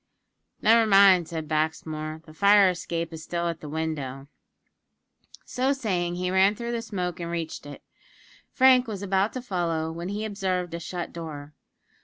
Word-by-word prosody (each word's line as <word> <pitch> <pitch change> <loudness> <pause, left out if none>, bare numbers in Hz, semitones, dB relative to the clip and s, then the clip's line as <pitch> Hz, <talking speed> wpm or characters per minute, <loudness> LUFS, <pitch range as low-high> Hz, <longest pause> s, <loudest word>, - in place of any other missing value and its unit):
"Never 225 0 +5
mind," 195 -4 +6
said 160 -2 -5
Baxmore, 155 0 -2
"the 155 - -14
fire 200 +2 +5
escape 170 -1 -4
is 160 - -7
still 170 +2 -3
at 165 -1 -3
the 150 - -8
window." 145 -4 -4 1.2
So 260 +2 0
saying, 180 -9 -2
he 180 0 -2
ran 190 +2 +4
through 235 +2 -5
the 235 -1 -2
smoke 180 -6 -4
and 170 -1 -4
reached 165 -3 -5
it. 145 - -10 0.7
Frank 255 -1 +5
was 205 -3 -5
about 195 +2 +1
to 255 - -5
follow, 165 -6 -2
when 170 +2 -6
he 210 +2 -3
observed 185 -4 -2
a 170 - -3
shut 175 +1 -6
door. 150 -3 -8
175 Hz, 165 wpm, -26 LUFS, 160-200 Hz, 1.2 s, mind